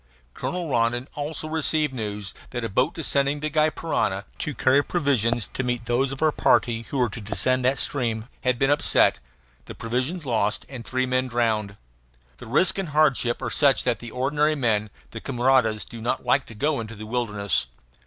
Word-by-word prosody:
Colonel 180 -1 -3
Rondon 120 -1 +1
also 150 +2 -4
received 155 -2 +1
news 105 -5 -4 0.2
that 120 -1 -4
a 115 - -2
boat 130 - +1
ascending 140 -2 +1
the 155 +1 -3
Gy 155 +1 +3
Parana, 105 -11 -1
to 150 - -3
carry 135 +2 +3
provisions 120 - 0
to - - -1
meet 120 -2 -2
those 125 +3 +1
of 135 +3 -4
our 155 - +4
party 115 -5 +2
who 140 - -3
were 125 -2 +3
to 110 - -7
descend 110 +6 0
that 130 +2 +2
stream, 115 -5 -2 0.2
had 125 -1 +2
been 135 +3 +2
upset, 145 - +3 0.5
the - - -9
provisions 130 +9 -2
lost, 110 -4 0
and 130 -4 -8
three 130 +4 -1
men 130 0 0
drowned. 110 -4 0 0.6
The 125 - -11
risk 165 - +3
and 190 -5 -3
hardship 140 -5 +2
are 120 - -2
such 140 +1 +4
that - - 0
the 120 - -8
ordinary 145 +5 +1
men, 110 -6 0 0.2
the - - -7
camaradas, 120 -3 +2
do 115 -1 -10
not 120 +3 -2
like 130 +2 +2
to 115 - -11
go 145 +5 0
into 115 0 -6
the 110 +1 -8
wilderness. 105 - 0
125 Hz, 190 wpm, -24 LUFS, 115-145 Hz, 0.6 s, our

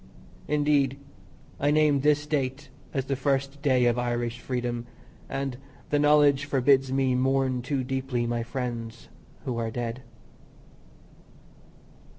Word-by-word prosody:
Indeed, 145 -2 +2 0.6
I 145 - +2
name 150 -1 +4
this 150 +1 +2
date 140 -1 -2 0.2
as 135 -1 -2
the 135 - -1
first 135 +1 -1
day 130 -4 +3
of 120 0 +2
Irish 120 -1 -2
freedom, 120 -2 -3 0.4
and 135 -2 -3 0.3
the 145 - +3
knowledge 145 -1 +4
forbids 135 -1 +3
me 135 -1 +2
mourn 130 0 +1
too 130 +1 -2
deeply 130 -2 -2
my 120 0 -1
friends 120 -2 -5 0.4
who 120 -3 -2
are 115 -1 -1
dead. 120 +2 -4
135 Hz, 125 wpm, -27 LUFS, 125-140 Hz, 0.6 s, name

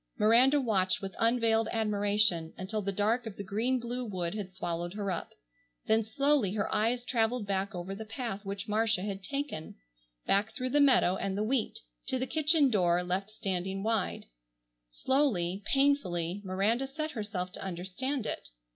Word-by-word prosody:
Miranda 245 +7 +5
watched 195 -8 +1
with 195 -1 -4
unveiled 230 -1 +3
admiration 205 -6 +1
until 205 +3 -3
the 200 0 -1
dark 220 +5 +1
of 210 - -7
the 200 - -4
green 225 +7 0
blue 245 +1 -4
wood 180 -6 -3
had 205 -3 -5
swallowed 175 0 -4
her 200 -2 -2
up, 175 - -4 0.6
then 220 +1 +3
slowly 265 -2 +2
her 200 - -1
eyes 240 +3 +1
traveled 230 -1 +1
back 195 0 -1
over 180 +2 -4
the 210 +3 -6
path 225 -2 -5
which 195 0 -5
Marcia 215 -2 +1
had 200 -1 -4
taken, 275 - -4 0.5
back 210 +3 +1
through 255 0 -2
the 290 - +4
meadow 250 -9 +5
and 195 0 -2
the 210 - +1
wheat, 230 0 0 0.3
to 260 - +1
the 255 - -1
kitchen 305 -2 +3
door 180 -4 +3
left 185 +3 -2
standing 190 -2 -3
wide. 220 -3 -1 0.6
Slowly, 195 - +1
painfully, 200 -11 +1
Miranda 205 +7 0
set 310 +3 -4
herself 205 -7 -4
to - - -8
understand 195 +9 -3
it. - - -4
210 Hz, 165 wpm, -30 LUFS, 190-245 Hz, 0.6 s, Miranda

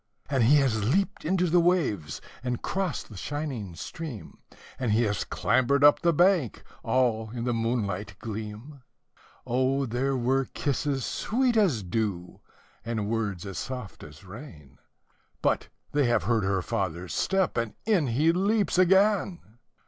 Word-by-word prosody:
And 130 -5 +3
he 140 +6 +6
has 125 -7 +2
leaped 180 - 0
into 180 +2 +2
the 175 +2 +4
waves, 150 - 0 0.2
and 125 -1 -3
crossed 190 -4 -2
the 110 - -11
shining 130 - -4
stream, 140 - -8 0.4
And 120 -5 0
he 115 +2 +3
has 105 -4 0
clambered 140 +2 +1
up 145 - +7
the 170 - +4
bank, 170 - +2 0.2
all 115 -4 +1
in 115 +1 -5
the 120 0 0
moonlight 115 -4 -2
gleam; 110 +6 -7 0.6
Oh 130 +3 +1
there 130 +3 -1
were 130 +2 +1
kisses 140 -1 -1
sweet 245 +2 0
as 175 - +2
dew, 90 -2 -3 0.4
and 110 -3 -2
words 105 -6 -2
as 95 -4 -5
soft 125 -6 -6
as 75 +5 -13
rain, 95 - -12 0.6
But - - 0 0.2
they 145 -1 +2
have 120 - +2
heard 115 -4 +1
her 95 -1 0
father's 90 -5 -3
step, 190 -1 +1
and 115 -2 -2
in 195 -10 +2
he 145 +8 +3
leaps 200 +2 +1
again! 185 - +2
125 Hz, 150 wpm, -27 LUFS, 110-155 Hz, 0.6 s, up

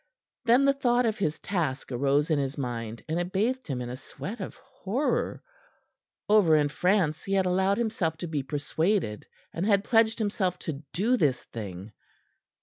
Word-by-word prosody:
Then 245 +4 +5
the 275 - +5
thought 245 -3 +2
of 220 -1 0
his 155 -6 -1
task 150 -10 -2
arose 140 +5 +1
in 150 - +3
his 140 +1 -2
mind, 115 -4 -4
and 160 +2 -1
it 175 +1 -3
bathed 245 +7 0
him 130 -4 -2
in 120 - -6
a - - -4
sweat 205 - -7
of 185 - -6
horror. 265 0 -2 0.8
Over 205 -7 +5
in 145 -1 +3
France 180 -1 +1
he 195 - -2
had 190 -1 +3
allowed 190 +2 +2
himself 215 -9 -1
to 175 - -5
be 155 -3 -1
persuaded, 145 - -1 0.3
and 165 - -2
had 200 -1 +3
pledged 225 -1 +3
himself 200 -5 0
to 150 -4 -4
do 225 +8 +2
this 140 - +1
thing. 100 -2 -7
180 Hz, 175 wpm, -28 LUFS, 145-215 Hz, 0.8 s, Then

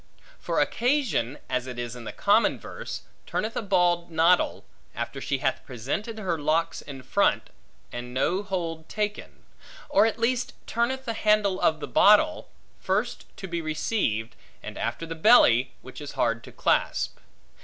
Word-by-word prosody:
For - - -1
occasion 240 - +1
(as 125 0 -2
it 125 -1 -7
is 120 0 -4
in 120 -1 -9
the - - -5
common 205 +3 +3
verse) - - -7 0.2
turneth 220 +1 -2
a - - -1
bald 175 -4 +2
noddle, 170 +2 +2 0.3
after - - -4
she - - -1
hath - - -1
presented 145 - -4
her 180 -6 -2
locks 160 +3 0
in 135 -3 -9
front, 200 +10 +1 0.4
and 120 0 -6
no 155 +9 +1
hold 170 -5 -4
taken; 210 -1 -4 0.5
or 205 +3 +5
at 225 - -2
least 240 +2 0
turneth 260 +3 -1
the 230 - -2
handle 210 -3 +2
of 155 -1 +2
the - - -4
bottle, 305 +10 +4 0.3
first 210 +5 -1
to 190 - -6
be 170 -1 -3
received, 155 - -1 0.3
and - - -7
after 165 - -3
the 165 - -5
belly, 160 - +5
which 130 +3 -10
is 145 - -7
hard 115 -1 0
to - - -11
clasp. - - 0
175 Hz, 160 wpm, -26 LUFS, 135-215 Hz, 0.5 s, or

